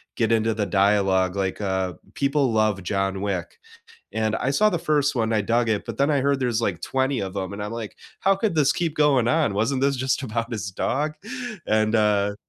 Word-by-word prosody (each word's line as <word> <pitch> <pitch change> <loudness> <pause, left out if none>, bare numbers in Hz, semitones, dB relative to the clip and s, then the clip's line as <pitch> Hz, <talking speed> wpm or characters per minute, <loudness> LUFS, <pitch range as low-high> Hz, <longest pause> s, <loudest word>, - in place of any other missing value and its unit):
get 115 -2 +1
into 110 0 +2
the 105 -2 -1
dialogue, 95 -2 +2
like, 95 +1 -2
uh, 95 -2 -1 0.2
people 140 -2 +1
love 110 -3 +1
John 95 0 -1
Wick. 100 -2 -3 0.6
And 110 -1 0
I 130 - -1
saw 210 +10 +3
the 175 - -1
1st 145 -3 +1
one, 115 -2 0
I 110 - +2
dug 115 +3 +1
it, 110 -2 0
but - - -6
then 140 +2 +2
I 140 -2 +2
heard 140 0 +1
there's 120 -3 0
like 85 -6 -1
20 130 +3 0
of 95 0 -5
'em 95 0 -3
and 105 +1 -5
I'm 105 +2 -5
like, 115 -3 -6 0.2
"How 195 +1 +3
could 200 -3 -1
this 145 -1 +3
keep 165 -3 -2
going 140 -6 +3
on? 150 -8 +2
Wasn't 115 +6 0
this 140 0 +2
just 130 +2 0
about 115 0 -3
his 105 -3 -3
dog?" 150 +10 -1 0.5
And, 110 +1 +2
uh 105 -2 +2
115 Hz, 215 wpm, -24 LUFS, 100-140 Hz, 0.6 s, saw